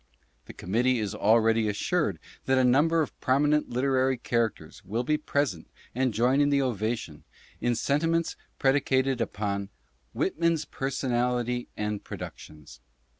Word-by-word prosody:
The - - -10
Committee 120 +7 +1
is 105 -2 -2
already 110 +1 +3
assured 100 - 0 0.3
that 130 0 +2
a 130 - +4
number 155 +6 +4
of 145 - -9
prominent 145 +3 +2
Literary 130 +1 +1
characters 115 -2 -2
will 115 +5 -2
be 150 +5 +1
present 145 - -2 0.2
and 130 +1 +1
join 125 +6 +2
in 145 - +3
the 140 -1 +3
ovation, 110 - -2 0.4
in 120 0 +1
sentiments 165 +7 0 0.2
predicated 135 -2 +2
upon 100 -1 -2 0.4
WHITMAN'S 165 -2 0
PERSONALITY 125 -2 -1
AND 105 -1 -3
PRODUCTIONS. 75 -5 -10
125 Hz, 125 wpm, -27 LUFS, 110-140 Hz, 0.4 s, a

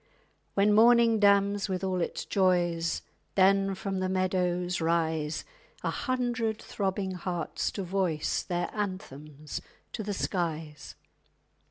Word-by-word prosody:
_ - - -38 0.5
When 205 +1 +4
morning 230 0 +6
damns 200 0 +3
with 185 0 -2
all 185 -1 0
its - - -3
joys 175 -3 +1 0.3
Then 195 0 +4
from 195 0 -3
the 185 0 -1
meadows 180 -1 0
rise 160 -2 0 0.4
A - - 0
hundred 245 -4 -1
throbbing 195 -1 -2
hearts 175 -2 -2
to 195 - -3
voice 180 -4 0
_Their 175 -1 -1
anthems 155 -8 -5 0.3
to 225 - -4
the 205 -1 -3
skies. 160 -6 -3
185 Hz, 125 wpm, -29 LUFS, 170-200 Hz, 0.5 s, morning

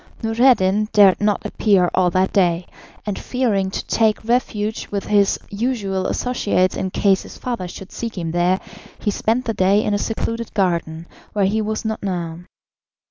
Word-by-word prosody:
Noureddin 225 -3 +3
dared 200 -2 +6
not 205 -1 +1
appear 195 -5 +2
all 185 -1 +3
that 185 +2 +1
day, 175 -2 +2 0.4
and 205 -2 -3
fearing 220 -7 0
to - - -5
take 220 -1 +1
refuge 220 -3 -1
with 200 -1 -3
his 205 -2 +3
usual 200 -4 -1
associates 205 -7 0
in 190 - -2
case 195 0 +2
his - - -11
father 235 -8 -4
should 185 +2 -10
seek 230 -3 -5
him 165 -2 -3
there, 175 +2 +2 0.4
he 205 - -1
spent 230 +5 0
the 225 - -1
day 200 +1 +3
in 210 - 0
a 205 - +1
secluded 230 +1 -3
garden 170 -4 -1 0.3
where 205 -2 +2
he 215 +3 +1
was 215 +1 -3
not 220 0 -2
known. 175 -3 -4
200 Hz, 170 wpm, -20 LUFS, 185-220 Hz, 0.4 s, dared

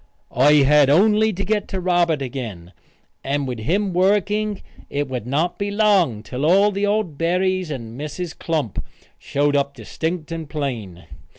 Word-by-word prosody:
I 140 +5 +5
had 145 0 +5
only 215 +7 +4
to 200 0 -4
get 210 -1 -1
Robert 175 -5 +1
again, 115 -10 -6 0.5
and 140 0 -1
with 125 -3 -4
him 185 - 0
working 205 +3 +1 0.3
it 145 0 -2
would 125 -3 -5
not 155 +7 -1
be 200 0 -1
long 200 - +2
till 130 +3 -5
all 195 +6 +4
the 200 +1 -1
old 205 -8 -1
Berrys 185 +1 0
and 120 -2 -6
Mrs. 155 +3 -5
Klump 155 - -2 0.4
showed 145 +1 0
up 140 0 0
distinct 160 +8 -4
and 165 -3 -5
plain. 115 - -5
160 Hz, 155 wpm, -21 LUFS, 135-190 Hz, 0.5 s, I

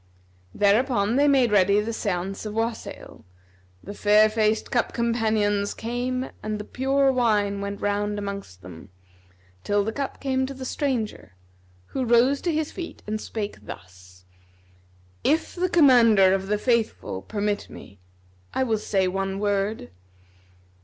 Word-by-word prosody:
Thereupon 210 +1 +2
they 285 +2 +4
made 265 -5 +4
ready 200 0 +4
the 215 +2 -2
sйance 195 -3 -3
of 210 - -6
wassail; 225 0 -4 0.6
the 205 - -7
fair 210 +1 +4
faced 215 0 0
cup 240 -2 0
companions 220 -3 0
came 250 +3 -3
and 215 0 -3
the - - -5
pure 270 +4 +1
wine[FN#252] 210 -5 +1
went 200 0 -5
round 205 0 -1
amongst 200 - -6
them, 85 -2 -11 0.7
till 205 0 +1
the 220 - -2
cup 275 +3 -4
came 260 -1 0
to 275 - -7
the 260 0 -7
stranger, 245 - -3 0.5
who 260 - -3
rose 245 +4 +3
to 345 - 0
his 310 -1 -1
feet 345 -2 -8
and 215 +1 -3
spake 205 - -5
thus, 90 +1 -12 1.0
"If 315 +2 +1
the 365 0 -1
Commander 230 - +6
of 195 0 -1
the 210 +1 +1
Faithful 225 - -1
permit 205 - -3
me, 100 0 -13 0.6
I 265 - +2
will 225 -4 0
say 190 -3 0
one 195 +1 -2
word." 200 - -1
215 Hz, 145 wpm, -24 LUFS, 200-250 Hz, 1.0 s, Commander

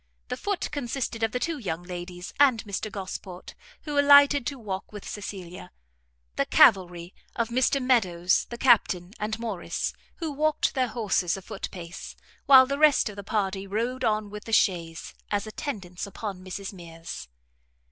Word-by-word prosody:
The - - -1
foot 405 -2 -3
consisted 250 -4 -3
of 225 0 +1
the 250 - -1
two 320 +3 -2
young 175 -7 -4
ladies, 180 0 -7
and 260 -6 +5
Mr 205 0 -4
Gosport, 185 -2 -7 0.3
who 295 -2 -1
alighted 285 -2 +6
to 280 - -3
walk 195 -5 -5
with 210 -2 -9
Cecilia; 185 - -7 0.7
the - - +1
cavalry, 175 -2 +4 0.2
of 230 -1 -1
Mr 255 +3 +2
Meadows, 185 -9 +2
the 235 - -6
Captain, 200 -7 +3
and 215 +2 -2
Morrice, 220 -6 -3 0.2
who 325 -3 -4
walked 305 +1 +1
their 260 -2 +1
horses 200 -7 0
a - - -8
foot 210 -1 -6
pace, 175 -1 -9 0.3
while 265 -1 +9
the 280 +2 -3
rest 300 -6 +5
of 210 - -9
the 200 - -7
party 195 -1 -2
rode 235 +6 -2
on 215 -2 0
with 210 0 -8
the 225 - -6
chaise, 170 -6 +1 0.2
as 205 0 -1
attendants 205 - -5
upon 200 -2 -6
Mrs 190 +2 -6
Mears. 165 - -9
210 Hz, 165 wpm, -26 LUFS, 185-255 Hz, 0.7 s, while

